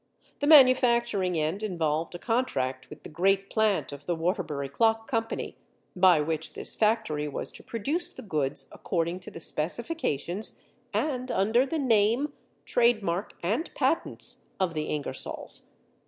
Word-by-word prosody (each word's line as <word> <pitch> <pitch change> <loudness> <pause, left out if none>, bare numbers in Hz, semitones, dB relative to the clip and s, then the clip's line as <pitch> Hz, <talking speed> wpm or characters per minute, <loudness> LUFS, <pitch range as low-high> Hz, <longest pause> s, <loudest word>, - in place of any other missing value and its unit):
The 285 - 0
manufacturing 240 - +5
end 160 +6 -1
involved 165 -5 -1
a - - -3
contract 175 - -1
with 150 - -12
the - - -8
great 195 +5 +1
plant 205 - +1
of 145 0 -10
the 175 - +1
Waterbury 165 -5 -2
Clock 225 +9 +1
Company, 225 -3 -3 0.4
by 180 -3 +6
which 160 +1 -3
this - - -3
factory 210 -9 +1
was 145 - -4
to - - -12
produce 285 - -2
the - - -10
goods 140 -8 -2
according 170 0 -2
to 180 - -8
the - - -9
specifications 175 - -2 0.3
and 255 -4 -1
under 225 +7 +2
the 320 - -2
name, 245 +2 +2 0.3
trade 235 -3 +3
mark, 175 +3 -2
and 225 - 0
patents - - -1
of 185 -3 +1
the 155 -1 -2
Ingersolls. 145 -3 -1
195 Hz, 145 wpm, -28 LUFS, 160-235 Hz, 0.4 s, by